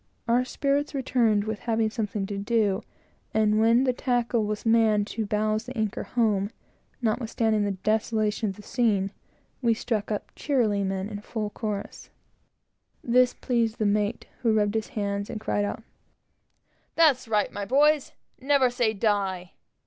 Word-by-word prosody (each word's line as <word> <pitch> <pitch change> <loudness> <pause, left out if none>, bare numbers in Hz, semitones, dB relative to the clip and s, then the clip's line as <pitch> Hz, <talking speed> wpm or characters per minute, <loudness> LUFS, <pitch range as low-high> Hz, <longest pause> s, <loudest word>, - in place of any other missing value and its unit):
Our 240 +2 +3
spirits 285 +3 -1
returned 235 -6 +2
with 220 -1 -4
having 225 -1 0
something 210 -3 -2
to 200 +1 -5
do; 205 -2 +1 0.5
and 215 -1 +3
when 230 +3 +4
the 255 -1 +2
tackle 245 -3 0
was 210 +1 -4
manned 220 -2 +4
to 220 -2 -2
bowse 215 +1 0
the 255 0 -7
anchor 215 -2 -1
home, 210 -4 0 0.5
notwithstanding 220 -2 +1
the 200 - -1
desolation 215 0 0
of 190 - -6
the 210 - -13
scene, 205 -6 +1 0.5
we 230 -3 +3
struck 220 -2 -2
up 210 - -3
"Cheerily 230 -8 +1
ho!" 195 - -1
in 205 +2 -5
full 215 -1 -4
chorus. 210 -2 -5 0.9
This 250 +1 +3
pleased 230 -3 0
the 215 - 0
mate, 210 +2 0 0.2
who 225 -3 +2
rubbed 205 -1 +2
his 220 -1 -1
hands 200 -1 -3
and 220 - -4
cried 205 -1 0
out 220 - -5 1.1
"That's 295 -7 +4
right, 210 -2 +1
my 205 - -4
boys; 295 +4 +3 0.3
never 265 -2 +3
say 240 -3 +1
die! 195 -4 -1
220 Hz, 155 wpm, -26 LUFS, 205-240 Hz, 1.1 s, when